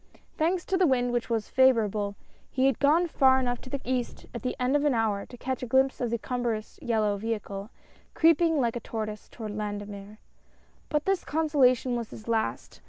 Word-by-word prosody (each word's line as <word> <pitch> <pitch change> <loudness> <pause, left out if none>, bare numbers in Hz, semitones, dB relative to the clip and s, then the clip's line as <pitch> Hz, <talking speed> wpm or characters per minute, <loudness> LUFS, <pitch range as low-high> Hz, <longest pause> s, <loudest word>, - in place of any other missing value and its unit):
Thanks 345 +3 0
to 380 - 0
the 370 -2 +4
wind 245 -2 +2
which 240 0 -1
was 225 -2 -1
favorable, 215 -6 +2 0.3
he 260 0 +1
had 270 - +2
gone 310 +5 +4
far 265 -5 +4
enough 245 -2 -1
to 255 - -10
the 280 - -3
east 250 -1 -2
at 235 - -5
the 250 - -2
end 250 +3 +1
of 290 - +2
an 290 -4 +2
hour 215 -3 0
to 245 - -12
catch 260 +2 -3
a 250 - -4
glimpse 265 +3 +2
of 240 - 0
the 235 - 0
cumbrous 235 -2 -3
yellow 215 -3 0
veliicle, 210 -2 -4 0.5
creeping 330 -1 +4
like 235 -3 +1
a - - -2
tortoise 215 -2 -5
toward 220 -3 -7
Landemer. 205 0 -6 0.7
But 300 0 0
this 385 -2 +1
consolation 270 -5 +2
was 235 -2 -4
his 215 - -11
last. 225 -1 -2
245 Hz, 195 wpm, -28 LUFS, 220-270 Hz, 0.7 s, the